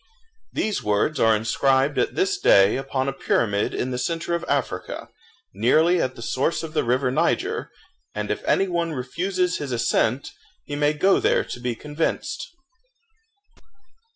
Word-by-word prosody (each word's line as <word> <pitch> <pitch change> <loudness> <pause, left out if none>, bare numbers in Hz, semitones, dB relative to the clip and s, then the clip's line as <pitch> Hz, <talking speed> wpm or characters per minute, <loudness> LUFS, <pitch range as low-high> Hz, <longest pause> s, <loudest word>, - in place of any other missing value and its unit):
These 215 -2 -1
words 105 +9 0
are 115 -1 +5
inscribed 135 +5 +1
at - - 0
this 390 0 +1
day 100 - +5
upon 135 0 -2
a 135 - -1
pyramid 105 -5 0
in 130 - -2
the 125 - -2
centre 165 +5 -2
of 170 0 -1
Africa, 140 -3 -2 0.4
nearly 155 - +3
at 130 0 -2
the 115 - -8
source 135 +8 -1
of 160 -1 -7
the 155 - +1
river 125 +2 +1
Niger; - - 0 0.5
and 105 0 -2
if 105 - -3
any 195 - +2
one 170 -2 -1
refuses 180 +7 -1
his 145 -3 -5
assent, 120 +2 0 0.3
he 145 - -5
may 145 +1 +2
go 190 +6 +3
there - - +2
to - - -7
be 120 -1 -2
convinced. 160 - -3
140 Hz, 155 wpm, -23 LUFS, 120-170 Hz, 0.5 s, are